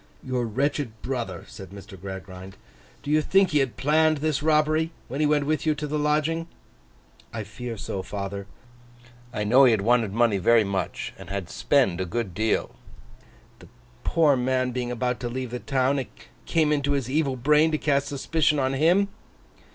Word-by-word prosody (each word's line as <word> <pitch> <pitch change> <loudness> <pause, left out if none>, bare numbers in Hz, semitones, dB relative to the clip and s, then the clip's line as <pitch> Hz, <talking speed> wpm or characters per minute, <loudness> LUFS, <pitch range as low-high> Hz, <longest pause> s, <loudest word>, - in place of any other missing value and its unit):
'Your 125 -2 -1
wretched 130 -1 -2
brother,' 120 -9 -4
said 95 -2 -10
Mr. 100 +1 -11
Gradgrind. 95 0 -9 0.5
'Do 145 - -3
you 155 +1 +4
think 195 +4 +3
he 150 - +3
had 135 -3 -1
planned 155 +2 +3
this 150 0 -1
robbery, 155 +1 +2 0.2
when 135 +3 -5
he 150 - +3
went 145 -1 +2
with 155 +1 0
you 155 -2 +1
to 150 0 -4
the 150 +1 -2
lodging?' 155 +3 0 0.8
'I - - -4
fear 120 -2 -7
so, 95 - -4
father. 100 +1 -5 0.8
I 105 -4 -2
know 125 +6 +6
he - - +6
had 105 - +1
wanted 115 -1 +2
money 110 -2 +2
very 115 +4 +5
much, 95 -3 -3
and - - -10
had 100 -3 -4
spent 90 -1 +2
a - - -1
great 105 0 -3
deal.' 110 +4 0 0.9
'The - - -15 0.4
poor 155 -4 +3
man 130 0 0
being 125 0 -3
about 125 0 -1
to 120 -1 -3
leave 130 0 -4
the 125 - -4
town, 135 +1 +1
it 130 - -5 0.4
came 155 -2 +2
into 145 -1 +1
his 135 -4 -1
evil 140 0 0
brain 150 +5 +4
to 155 - 0
cast 140 -2 +1
suspicion 150 +2 +1
on 135 -1 +1
him? 170 +8 +3
130 Hz, 180 wpm, -25 LUFS, 110-150 Hz, 0.9 s, know